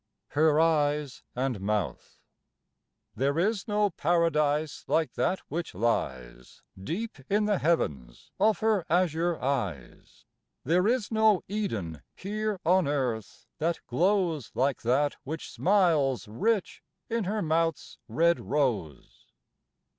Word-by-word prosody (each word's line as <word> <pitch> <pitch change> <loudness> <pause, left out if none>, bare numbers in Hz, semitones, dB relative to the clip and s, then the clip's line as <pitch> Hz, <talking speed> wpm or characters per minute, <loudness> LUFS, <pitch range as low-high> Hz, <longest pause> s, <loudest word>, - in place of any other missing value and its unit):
HER 155 +1 +3
EYES 150 -4 +1
AND 125 -5 -1
MOUTH. 105 -2 -2 1.0
There 140 +3 0
is 200 +3 0
no 210 -1 +1
Paradise 155 -3 +1
like 160 -1 +1
that 190 - 0
which 165 - -4
lies 65 - -3 0.2
Deep 195 - -4
in 210 +1 +2
the 205 -2 +1
heavens 70 - -1
of 210 -1 +3
her 215 -4 +2
azure 170 0 +1
eyes: 105 - -4 0.4
There 180 +7 +2
is 240 -2 0
no 220 -3 +3
Eden 110 - -3
here 210 +1 -3
on 180 -1 +4
Earth 125 -7 -2
that 165 +2 0
glows 175 - +1
Like 135 0 +1
that 135 +5 +1
which 155 +4 -6
smiles 160 - +2
rich 200 - -1 0.3
in 230 -3 -1
her 210 +2 -1
mouth's 165 0 -1
red 170 +1 +2
rose. 105 - -2
160 Hz, 115 wpm, -28 LUFS, 130-190 Hz, 1.0 s, on